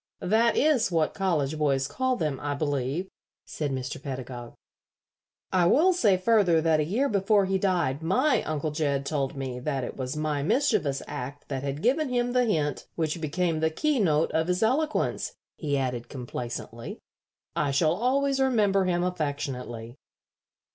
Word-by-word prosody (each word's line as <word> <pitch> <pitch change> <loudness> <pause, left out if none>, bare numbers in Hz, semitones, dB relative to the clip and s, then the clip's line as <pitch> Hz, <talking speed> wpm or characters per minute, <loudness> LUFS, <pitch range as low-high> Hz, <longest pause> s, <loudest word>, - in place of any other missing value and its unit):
"That 225 +4 +3
is 275 -9 +3
what 160 -2 +1
college 155 -6 0
boys 135 -3 +1
call 260 - 0
them, 155 - -2
I 145 0 -2
believe," 145 +4 -1 0.4
said 150 -2 -3
Mr. 130 0 -4
Pedagog. 130 -3 -6 1.0
"I 180 -2 +3
will 335 - +5
say 210 - +3
further 185 -4 +4
that 160 -1 +2
a - - +3
year 220 - +1
before 200 -2 +3
he 190 0 0
died 175 -8 0
my 255 - +2
Uncle 155 0 -2
Jed 145 -3 -1
told 140 -2 -1
me 130 -2 -4
that 135 0 -2
it - - -5
was 130 +2 -4
my 150 -2 -1
mischievous 150 - +1
act 135 +3 -7
that 135 -2 -2
had 140 +2 -4
given 275 +4 +2
him 245 -1 0
the 250 -1 +3
hint 150 - -1
which 160 0 -2
became 165 +1 0
the 160 0 +2
keynote 175 - +1
of 160 +1 +1
his 180 +3 +1
eloquence," 300 +7 0 0.2
he 145 -3 -1
added, 125 -3 -2
complacently. 120 -2 -6 0.6
"I 145 - +1
shall 155 +3 +3
always 270 +6 +1
remember 210 -7 +3
him 175 -1 +1
affectionately." 140 -9 -3
160 Hz, 160 wpm, -27 LUFS, 140-205 Hz, 1.0 s, will